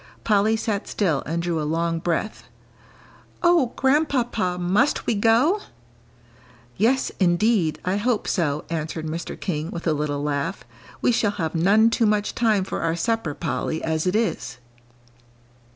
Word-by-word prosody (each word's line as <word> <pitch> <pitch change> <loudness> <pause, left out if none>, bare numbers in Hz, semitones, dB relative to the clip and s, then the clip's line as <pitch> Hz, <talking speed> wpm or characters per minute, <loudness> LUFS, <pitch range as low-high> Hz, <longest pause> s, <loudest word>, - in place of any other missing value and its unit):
Polly 215 +1 +3
sat 215 -2 -2
still 165 -9 0
and 170 +2 -2
drew 170 -2 -1
a - - -2
long 165 +2 -1
breath. 175 +5 -2 1.0
"Oh, 340 -8 +4
Grandpapa, 255 - +1
must 195 +11 +1
we - - +1
go?" 230 - +3 1.2
"Yes, 245 +6 +1
indeed, 175 -3 +2
I 185 +2 0
hope 225 +1 0
so," 155 -5 -1
answered 160 0 -3
Mr. 165 +2 -5
King, 160 -3 -3
with 170 - -6
a 160 - +2
little 145 -1 -2
laugh. 145 +5 -2 0.4
"We - - +4
shall 225 -3 +2
have 175 -6 -3
none 205 +7 +4
too 230 -1 +2
much 210 0 0
time 215 -5 +2
for - - -4
our 165 0 0
supper, 170 -4 -1
Polly, 160 0 -3
as 160 +2 -1
it 180 - +1
is." 165 - -1
185 Hz, 150 wpm, -23 LUFS, 160-225 Hz, 1.2 s, Oh